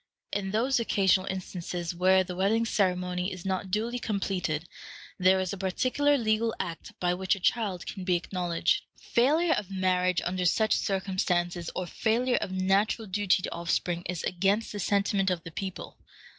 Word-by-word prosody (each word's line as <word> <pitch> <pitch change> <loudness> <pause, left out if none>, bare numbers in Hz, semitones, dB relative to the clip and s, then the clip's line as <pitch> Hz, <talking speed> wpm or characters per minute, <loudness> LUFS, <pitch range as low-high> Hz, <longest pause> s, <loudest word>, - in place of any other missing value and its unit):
In 200 -1 -1
those 240 +6 +1
occasional 190 -4 +2
instances 180 -2 -4
where 185 +2 +4
the 180 -1 -6
wedding 210 +5 +2
ceremony 180 -3 0
is 185 -1 -8
not 190 0 -2
duly 230 +5 -1
completed, 185 -7 -2 0.5
there 185 +1 +5
is 185 0 -2
a 200 - -6
particular 255 +10 +2
legal 225 -1 +1
act 170 -3 -5
by 175 0 +1
which 190 +2 +1
a - - -9
child 195 -2 0
can 190 - -6
be 180 -1 +2
acknowledged. 175 - 0 0.2
Failure 310 +8 +2
of 200 -3 -2
marriage 185 -2 +1
under 180 0 -1
such 215 +5 +3
circumstances, 180 -3 -1
or 185 - -2
failure 240 +7 +1
of - - -2
natural 195 +4 +1
duty 190 -2 +1
to - - -3
offspring, 170 0 -1
is 175 -1 -3
against 195 +5 +1
the 205 - -5
sentiment 195 0 +1
of 175 -2 -2
the 165 - -8
people. 190 -1 -6
190 Hz, 165 wpm, -28 LUFS, 180-210 Hz, 0.5 s, there